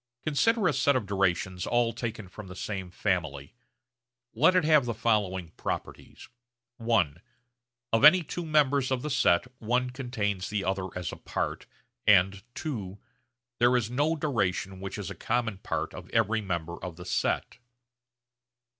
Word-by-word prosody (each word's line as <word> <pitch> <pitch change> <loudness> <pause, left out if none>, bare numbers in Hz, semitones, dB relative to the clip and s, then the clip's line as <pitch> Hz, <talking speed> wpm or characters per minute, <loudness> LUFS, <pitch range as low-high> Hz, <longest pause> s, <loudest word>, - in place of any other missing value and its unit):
Consider 200 +8 +2
a 155 - +2
set 140 0 +3
of 125 -5 0
durations 95 -2 0
all 120 -1 +2
taken 110 -3 -5
from 95 +2 -10
the 90 - -9
same 95 -1 -4
family. 80 -7 -2 0.8
Let 160 +11 +4
it 185 - +4
have 155 -4 +5
the 115 -2 -2
following 100 -7 0
properties: - - -6 0.5
(i) 115 -10 +2 0.8
of 115 - +3
any 170 +4 +8
two 175 +3 -5
members 145 -4 +2
of 130 -2 -1
the 150 - -3
set 130 -10 +3
one 125 +3 0
contains 110 -7 -2
the 105 -2 -1
other 95 -1 -1
as 90 -3 -3
a - - -8
part, - - -4 0.4
and 95 -1 +5 0.2
(ii) 105 -10 -4 0.6
there 120 +1 +5
is 115 -1 -2
no 145 +6 +1
duration 100 - -1
which 95 0 -6
is - - -5
a - - -4
common 115 -5 -1
part - - -3
of - - -10
every 115 -1 +1
member 85 -3 -4
of 90 -2 -5
the 90 +1 -10
set. - - -1
110 Hz, 155 wpm, -28 LUFS, 95-130 Hz, 0.8 s, any